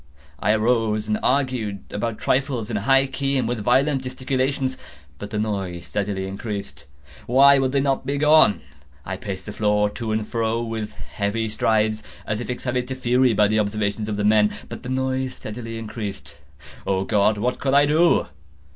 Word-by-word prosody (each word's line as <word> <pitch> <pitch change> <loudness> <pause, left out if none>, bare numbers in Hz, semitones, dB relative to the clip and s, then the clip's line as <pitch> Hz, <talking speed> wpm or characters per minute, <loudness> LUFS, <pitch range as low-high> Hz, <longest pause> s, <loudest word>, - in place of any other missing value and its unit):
I 105 - +2
arose 110 -1 +1
and 105 0 0
argued 125 -8 0
about 110 +1 -3
trifles, 130 -4 -1
in 110 - 0
a - - -2
high 135 +4 +4
key 135 +1 -1
and 125 -3 0
with 120 -1 -2
violent 135 +4 +2
gesticulations; 130 +1 -1 0.4
but 105 - -6
the 105 - -4
noise 95 -5 -3
steadily 100 0 -2
increased. 95 - -6 0.4
Why 140 +3 +6
would 130 -1 +1
they 140 0 +2
not 135 -1 0
be 140 +2 -2
gone? 150 -6 +5 0.4
I 95 - -3
paced 95 -1 -6
the 105 - -6
floor 105 -1 +1
to 115 0 -4
and 110 0 -1
fro 115 0 -1
with 110 -2 -4
heavy 110 +2 -3
strides, 110 0 +1 0.2
as 105 -1 -2
if 120 - -6
excited 125 0 -2
to 130 - -4
fury 125 -1 +2
by 105 0 +4
the 110 +1 +1
observations 105 0 -1
of 105 - -2
the 105 - 0
men—but 105 0 +1
the 125 - -7
noise 130 0 -1
steadily 115 +1 -7
increased. 110 -2 -7 0.5
Oh 95 -1 +1
God! 105 +1 +2
what 120 +4 -1
could 135 0 +1
I 145 +1 +6
do? 160 +4 +3
115 Hz, 180 wpm, -23 LUFS, 105-130 Hz, 0.5 s, Why